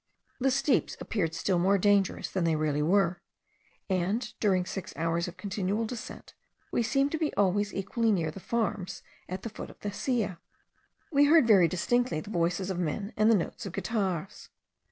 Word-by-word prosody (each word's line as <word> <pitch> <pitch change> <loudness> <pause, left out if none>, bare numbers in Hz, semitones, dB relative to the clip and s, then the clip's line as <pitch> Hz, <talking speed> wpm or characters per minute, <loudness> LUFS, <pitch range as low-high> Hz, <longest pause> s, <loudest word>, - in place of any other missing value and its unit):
The 270 +1 +3
steeps 275 0 +1
appeared 165 -7 -2
still 180 +1 +1
more 195 +3 +4
dangerous 200 -1 +2
than 185 - 0
they 165 -1 +2
really 150 -1 0
were; 175 +2 +2 0.7
and, 195 +5 -1
during 185 -4 +2
six 190 0 -6
hours 165 +1 0
of 175 +1 -8
continual 200 +3 -2
descent, 230 +1 -8 0.4
we - - +1
seemed 275 +4 +1
to 320 - -2
be 315 -2 0
always 205 +1 +2
equally 220 +4 0
near 165 -6 0
the 195 - -9
farms 200 -4 -2 0.3
at 185 +1 -5
the 230 - -4
foot 215 - -8
of - - -15
the 205 - -3
Silla. 210 -6 -1 0.7
We 290 -1 +5
heard 315 -2 +6
very 195 -6 +6
distinctly 240 +3 0
the 205 +6 -8
voices 180 +2 0
of 180 - -3
men 180 +5 -2
and 215 +1 +4
the 225 - +6
notes 195 +1 -3
of 180 - -7
guitars. 195 -2 -3
195 Hz, 180 wpm, -29 LUFS, 180-225 Hz, 0.7 s, heard